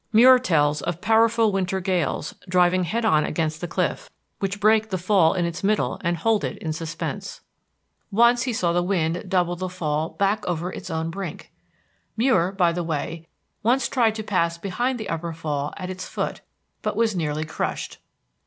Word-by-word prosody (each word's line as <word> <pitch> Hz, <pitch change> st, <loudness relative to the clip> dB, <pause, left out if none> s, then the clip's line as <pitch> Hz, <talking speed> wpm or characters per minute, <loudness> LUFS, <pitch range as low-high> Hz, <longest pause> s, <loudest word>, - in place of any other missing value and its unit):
Muir 250 Hz, +3 st, +8 dB
tells 150 Hz, -, +2 dB
of 175 Hz, +2 st, -3 dB
powerful 225 Hz, +1 st, +3 dB
winter 190 Hz, -1 st, -1 dB
gales 175 Hz, -5 st, -1 dB, 0.2 s
driving 180 Hz, 0 st, +3 dB
head 225 Hz, +7 st, -1 dB
on 155 Hz, -7 st, +4 dB
against 155 Hz, 0 st, -2 dB
the 175 Hz, -, -3 dB
cliff, -, -, -2 dB, 0.3 s
which 200 Hz, +1 st, -2 dB
break 220 Hz, +1 st, +3 dB
the 190 Hz, -, -1 dB
fall 180 Hz, -2 st, +3 dB
in 175 Hz, -2 st, +1 dB
its 170 Hz, +2 st, -4 dB
middle 210 Hz, +1 st, 0 dB
and 170 Hz, -1 st, 0 dB
hold 215 Hz, +4 st, +1 dB
it -, -, -3 dB
in 160 Hz, -2 st, -3 dB
suspense. 165 Hz, 0 st, -5 dB, 0.7 s
Once 235 Hz, +3 st, +4 dB
he 255 Hz, -, -1 dB
saw 175 Hz, -7 st, 0 dB
the 175 Hz, -, +2 dB
wind 175 Hz, -2 st, 0 dB
double 180 Hz, -2 st, +1 dB
the 185 Hz, +1 st, -4 dB
fall 155 Hz, -3 st, -2 dB
back 200 Hz, +2 st, 0 dB
over 175 Hz, +1 st, -2 dB
its -, -, -8 dB
own 160 Hz, 0 st, -2 dB
brink. 195 Hz, +2 st, -7 dB, 0.7 s
Muir, 220 Hz, -7 st, +3 dB
by 180 Hz, -3 st, +2 dB
the 175 Hz, +1 st, -2 dB
way, 165 Hz, +1 st, -4 dB, 0.3 s
once 250 Hz, +5 st, +2 dB
tried 230 Hz, -4 st, +2 dB
to 220 Hz, -, -4 dB
pass 170 Hz, -5 st, 0 dB
behind 240 Hz, +8 st, -2 dB
the 215 Hz, -, -5 dB
Upper 165 Hz, 0 st, -3 dB
Fall 150 Hz, -3 st, -3 dB
at 185 Hz, -2 st, -5 dB
its 185 Hz, 0 st, -6 dB
foot, -, -, -3 dB, 0.4 s
but -, -, -2 dB
was 225 Hz, -3 st, +1 dB
nearly 155 Hz, -2 st, -1 dB
crushed. 155 Hz, -, -4 dB
180 Hz, 180 wpm, -24 LUFS, 165-215 Hz, 0.7 s, Muir